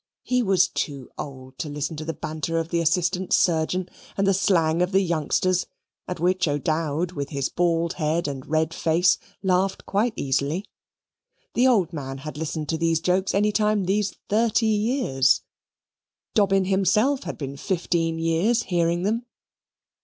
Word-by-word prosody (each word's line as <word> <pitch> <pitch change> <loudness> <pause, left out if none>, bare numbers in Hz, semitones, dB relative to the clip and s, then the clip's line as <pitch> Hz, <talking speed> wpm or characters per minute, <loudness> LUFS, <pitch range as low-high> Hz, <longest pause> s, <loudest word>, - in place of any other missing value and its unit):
He 250 0 +1
was 190 -5 +3
too 140 -8 -4
old 130 -2 -9
to 155 - -3
listen 145 +2 -3
to 155 - -5
the 165 - -3
banter 155 +1 -3
of 165 0 -2
the 170 - 0
assistant 180 +2 0
surgeon 175 +2 +2 0.3
and 195 - +2
the 195 - +4
slang 170 -4 +2
of 180 +2 0
the 195 - +5
youngsters, 175 +1 0 0.4
at 180 - -4
which 180 +1 +2
old 145 -1 0
O'Dowd, 160 +2 -1
with 145 -5 -4
his 140 -3 -2
bald 170 -1 +1
head 160 +1 -1
and 135 -2 -6
red 160 +1 0
face, 170 +2 +2 0.2
laughed 190 +1 +1
quite 215 +4 +1
easily. 140 +7 -1 0.9
The 250 +2 +4
old 195 -9 +2
man 135 -3 -5
had 150 +3 -7
listened 155 0 -4
to 160 - -1
those 165 -1 +2
jokes 185 +3 +1
any 210 +1 +3
time 210 -1 +2
these 200 +1 0
thirty 225 +2 +2
years 215 - +2 0.9
Dobbin 195 -3 +3
himself 200 +8 +2
had - - -5
been 140 -2 -5
fifteen 165 0 -1
years 165 +9 +1
hearing 170 -1 0
them. 230 +4 -1
170 Hz, 160 wpm, -24 LUFS, 155-195 Hz, 0.9 s, the